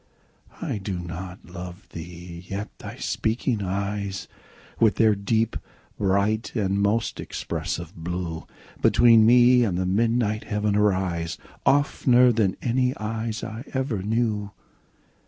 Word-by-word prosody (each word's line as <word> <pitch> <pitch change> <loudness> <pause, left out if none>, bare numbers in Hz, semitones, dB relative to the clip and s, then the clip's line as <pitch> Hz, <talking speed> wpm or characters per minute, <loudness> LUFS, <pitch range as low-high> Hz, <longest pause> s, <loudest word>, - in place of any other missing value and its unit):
I 105 - -2
do 95 -1 -4
not 90 +2 -7
love 90 +1 -9
thee!—yet 90 +4 -7
thy - - -8
speaking 110 0 -1
eyes, 100 0 -3 0.5
With 110 -4 +4
their 110 -1 +4
deep, 110 +3 0 0.4
bright, 100 +4 0
and 100 -2 +1
most 105 +3 0
expressive - - -4
blue, 85 -1 -4 0.3
Between 115 -2 +6
me 125 +1 +6
and 95 -6 0
the 95 - 0
midnight 110 +2 +1
heaven 105 -1 0
arise, 95 -5 +1
15 - - -22
Oftener 125 -3 +4
than 105 -5 +1
any 125 +1 +1
eyes 110 +1 -3
I 110 +2 -6
ever 130 -7 -1
knew. 105 -1 0
105 Hz, 120 wpm, -25 LUFS, 95-115 Hz, 0.5 s, Between